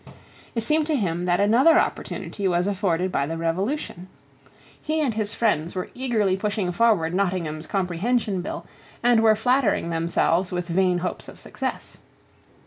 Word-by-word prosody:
It 230 - -1
seemed 305 +4 +1
to 315 - +1
him 175 -7 -1
that 175 0 +2
another 240 +11 +5
opportunity 200 -2 -2
was 175 -1 +1
afforded 185 -3 0
by 140 -4 0
the 165 +1 -4
Revolution. 180 - -2 0.7
He 310 +1 -1
and 280 -7 +1
his 215 0 -2
friends 175 -8 0
were 185 - -3
eagerly 225 -7 0
pushing 205 -2 -1
forward 180 -5 +2
Nottingham's 175 -5 -1
Comprehension 195 +2 0
Bill, 175 - -6 0.4
and 240 -1 +5
were 220 -1 +5
flattering 220 -6 +1
themselves 170 +2 +1
with 180 -1 -3
vain 180 +1 +2
hopes 180 +1 -4
of - - -12
success. - - -5
190 Hz, 150 wpm, -24 LUFS, 175-225 Hz, 0.7 s, another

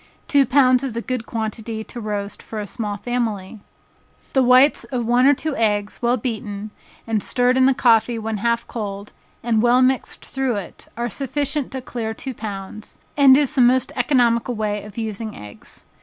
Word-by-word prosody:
Two 280 -3 +4
pounds 255 -1 +4
is 260 -4 -4
a - - -1
good 250 -3 -4
quantity 220 0 -4
to 240 - -9
roast 205 -1 -4
for 220 - -7
a 210 - -4
small 205 0 -4
family. 225 -3 -3 0.7
The 265 - +4
whites 255 +3 +5
of 245 -3 -3
one 245 +3 +4
or 285 - +6
two 310 +1 -3
eggs, 210 -2 0
well 240 +1 +2
beaten, 215 -3 -5 0.3
and 225 -2 -1
stirred 250 +3 +2
in 260 0 +5
the 270 - +3
coffee 230 -1 +3
when 220 -1 -3
half 235 +3 0
cold, 205 -2 -6 0.3
and 225 -2 +2
well 245 +2 +4
mixed 260 0 0
through 265 -3 -1
it, 200 -4 -8
are 240 0 -1
sufficient 280 +3 -2
to 260 - -4
clear 225 -3 -4
two 265 +2 -6
pounds, 210 -1 -8 0.2
and 275 -2 +7
is 295 0 +1
the 270 - +2
most 250 +1 +3
economical 245 -2 +2
way 210 -1 -2
of 210 0 -12
using 220 -1 -4
eggs. 105 0 -12
235 Hz, 185 wpm, -21 LUFS, 215-255 Hz, 0.7 s, and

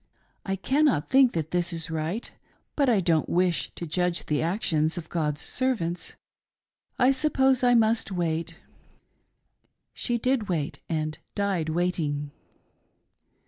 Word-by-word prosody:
I 195 - -1
cannot 265 - +1
think 265 -2 +6
that 160 -2 -3
this 175 0 0
is 165 -1 -3
right, 160 +8 -3 0.4
but 280 -3 +3
I 215 -5 +3
don't 165 -3 +1
wish 180 0 +1
to 170 - -5
judge 175 +2 -1
the 150 - 0
actions 160 -2 0
of 165 -2 -6
God's 150 -3 -1
servants. 220 -10 -2 0.8
I 255 +1 +5
suppose 265 -2 +2
I 245 0 +5
must 225 -2 +2
wait." 165 -2 -2 1.4
She 240 -2 -1
did 240 -3 0
wait, 155 -5 -2
and 155 -2 -2 0.2
died 195 -6 0
waiting. 155 -4 -1
175 Hz, 130 wpm, -26 LUFS, 160-235 Hz, 1.4 s, think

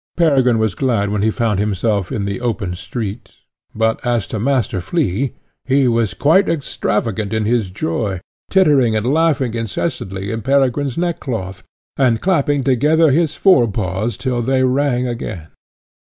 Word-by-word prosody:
Peregrine 135 -8 +3
was 110 -3 0
glad 110 -4 0
when 105 -1 -1
he 110 - +2
found 110 -3 0
himself 105 -1 -1
in 100 - -2
the 100 +4 -4
open 110 -7 -2
street; 100 +3 -6 0.5
but 110 0 0
as 120 -4 0
to 110 - -5
Master 120 -6 0
Flea, 130 - -1 0.3
he 135 0 +2
was 115 -4 0
quite 185 +7 +3
extravagant 110 - -2
in 110 -1 0
his 115 -3 +1
joy, 95 +1 -2 0.3
tittering 145 - +3
and 110 +1 -1
laughing 140 -3 +1
incessantly 110 - -3
in 115 0 -3
Peregrine's 135 +1 +1
neckcloth, 120 - -3 0.4
and 125 -4 +2
clapping 145 -5 +1
together 150 +5 +3
his 155 +1 +1
fore 160 -12 +4
paws 100 +2 -2
till 125 -3 -1
they 130 +2 +1
rang 130 -1 +1
again. 95 -9 -5
120 Hz, 150 wpm, -18 LUFS, 105-140 Hz, 0.5 s, fore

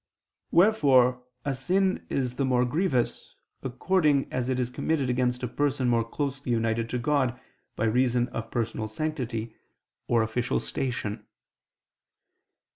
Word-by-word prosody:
Wherefore 135 - +4 0.2
a 140 - 0
sin 185 +9 0
is 125 -3 -1
the 140 - +1
more 125 -2 +2
grievous, 130 -2 -1 0.3
according 145 +2 +1
as 130 0 -1
it 130 -1 0
is 125 -1 -1
committed 140 -2 0
against 125 0 0
a - - 0
person 135 0 0
more 115 -1 +3
closely 140 +2 -3
united 115 0 0
to 125 - -1
God 130 -1 +1 0.4
by 110 - 0
reason 120 +1 +2
of 115 -1 -5
personal 115 -2 -2
sanctity, 115 -4 -3 0.5
or 115 -1 +3
official 110 +2 -1
station. 110 -5 -3
125 Hz, 130 wpm, -27 LUFS, 120-140 Hz, 0.5 s, Wherefore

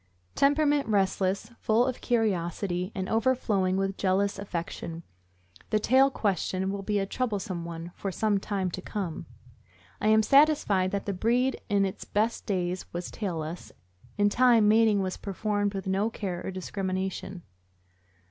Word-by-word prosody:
Temperament 290 -1 +3
restless, 195 0 0
full 225 +3 +3
of 255 -1 -3
curiosity, 185 -4 -1
and 190 -2 -3
overflowing 220 -6 +1
with 195 0 -1
jealous 195 +1 +1
affection. 170 -3 -5 0.7
The 215 - +2
tail 260 +5 +4
question 190 -4 -1
will 200 0 -4
be 205 +1 -1
a 195 - +1
troublesome 195 -6 -3
one 170 0 -7
for 195 - -4
some 205 +1 +1
time 195 -2 -2
to 185 - -5
come. 185 -5 -5 0.7
I - - +1
am 220 0 +5
satisfied 275 -10 +4
that 200 0 -3
the 200 - -2
breed 240 +7 +1
in 200 -1 +3
its 190 - -5
best 220 +3 -1
days 185 -2 -2
was 175 +1 -5
tailless; 170 -5 -5 0.5
in 205 0 +4
time, 235 -2 +5
mating 215 -2 +4
was 185 -1 -3
per 200 - -6
formed 205 0 -1
with 195 - -4
no 195 +3 +1
care 185 -6 -4
or - - -4
discrimination. 190 -1 -4
200 Hz, 150 wpm, -28 LUFS, 185-220 Hz, 0.7 s, am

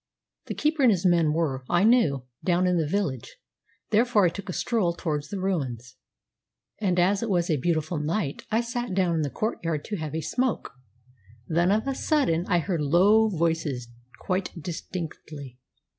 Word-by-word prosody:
The - - -4
keeper 305 0 0
and 255 - +6
his 190 -2 0
men 170 -4 +4
were, 150 -5 -1
I 175 +2 +3
knew, 165 - +3 0.2
down 180 0 +2
in 180 -1 +2
the 155 - 0
village; 150 - -2 0.5
therefore 220 -2 +4
I - - +4
took 200 +3 -8
a - - -2
stroll 200 -6 0
towards 150 -4 -3
the 200 - -4
ruins, 130 -10 -3 0.8
and, 185 -4 +1
as 195 +3 +3
it 230 - -2
was 175 -3 +1
a 155 - +2
beautiful 155 +2 -1
night, 150 0 -2
I 225 +2 +2
sat 240 -3 -3
down 185 -3 +2
in 160 - +1
the 145 - -1
courtyard 165 - -2
to 210 - -3
have 155 -2 -5
a 160 - -1
smoke. 250 +6 -1 0.8
Then, 175 +3 +2
of 220 +5 +1
a 270 - 0
sudden, 260 - +1
I 180 - +3
heard 170 -1 -1
low 195 +9 +4
voices 160 - -1 0.3
quite 185 -1 -2
distinctly. 155 -5 -7
175 Hz, 175 wpm, -26 LUFS, 155-205 Hz, 0.8 s, and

